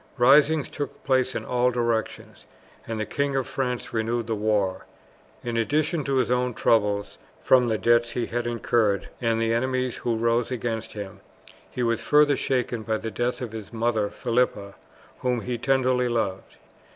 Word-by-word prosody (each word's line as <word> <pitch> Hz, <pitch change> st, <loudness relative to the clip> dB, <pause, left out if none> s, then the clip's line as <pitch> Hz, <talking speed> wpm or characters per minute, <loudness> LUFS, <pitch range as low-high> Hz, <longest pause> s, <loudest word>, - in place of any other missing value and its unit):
Risings 145 Hz, +4 st, +5 dB
took 145 Hz, -, -6 dB
place 130 Hz, -1 st, +1 dB
in -, -, -3 dB
all 125 Hz, 0 st, +2 dB
directions, 120 Hz, -2 st, -3 dB, 0.4 s
and 115 Hz, -1 st, -3 dB
the 110 Hz, -, -1 dB
King 140 Hz, -1 st, -1 dB
of 135 Hz, -2 st, 0 dB
France 125 Hz, -2 st, -3 dB
renewed 115 Hz, +1 st, -1 dB
the 115 Hz, -, -2 dB
war. 105 Hz, -3 st, 0 dB, 0.6 s
In 120 Hz, -1 st, -2 dB
addition 150 Hz, +6 st, 0 dB
to 140 Hz, -, 0 dB
his 125 Hz, -2 st, +1 dB
own 125 Hz, -1 st, 0 dB
troubles 105 Hz, -2 st, +1 dB, 0.2 s
from 125 Hz, -2 st, +4 dB
the 110 Hz, -2 st, +1 dB
debts 120 Hz, +3 st, +2 dB
he 120 Hz, -, -1 dB
had 120 Hz, 0 st, -3 dB
incurred, 110 Hz, -4 st, 0 dB
and 115 Hz, -1 st, +1 dB
the 115 Hz, 0 st, +1 dB
enemies 130 Hz, +1 st, -1 dB
who 120 Hz, -1 st, -1 dB
rose 115 Hz, +1 st, +1 dB
against 115 Hz, -3 st, -3 dB
him, 100 Hz, -3 st, -7 dB, 0.5 s
he 125 Hz, -, -3 dB
was 115 Hz, -1 st, 0 dB
further 150 Hz, -1 st, +4 dB
shaken 125 Hz, -4 st, -1 dB
by 110 Hz, 0 st, -1 dB
the 110 Hz, +1 st, -5 dB
death 120 Hz, +3 st, -2 dB
of 120 Hz, -3 st, -4 dB
his 110 Hz, -3 st, -8 dB
mother 110 Hz, -3 st, 0 dB
Philippa, 115 Hz, -5 st, -1 dB, 0.5 s
whom 125 Hz, -2 st, 0 dB
he 120 Hz, 0 st, -4 dB
tenderly 130 Hz, -1 st, +2 dB
loved. 105 Hz, -5 st, -2 dB
120 Hz, 170 wpm, -25 LUFS, 110-125 Hz, 0.6 s, Risings